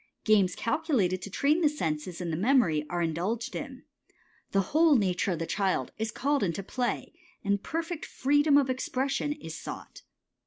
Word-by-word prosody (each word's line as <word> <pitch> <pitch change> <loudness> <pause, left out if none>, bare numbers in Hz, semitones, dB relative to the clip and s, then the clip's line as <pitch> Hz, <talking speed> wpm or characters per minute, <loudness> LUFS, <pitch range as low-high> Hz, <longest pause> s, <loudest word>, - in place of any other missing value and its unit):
Games 200 -4 +3
calculated 230 - 0
to 200 - -6
train 290 - +2
the 305 - +5
senses 170 - -3
and 170 -3 -3
the - - +1
memory 180 - +2
are 175 -1 -1
indulged 180 +9 -2
in. 270 -3 -6 0.7
The 195 - +2
whole 315 -1 +6
nature 190 -3 +1
of - - -3
the 165 - -3
child 195 +2 0
is 220 0 -1
called 280 +6 0
into 195 0 -1
play, 245 +5 -2 0.3
and 200 0 +1
perfect 330 +3 -4
freedom 290 +2 +3
of 280 -2 +3
expression 265 +2 -1
is 160 - -8
sought. - - -8
220 Hz, 165 wpm, -28 LUFS, 180-280 Hz, 0.7 s, whole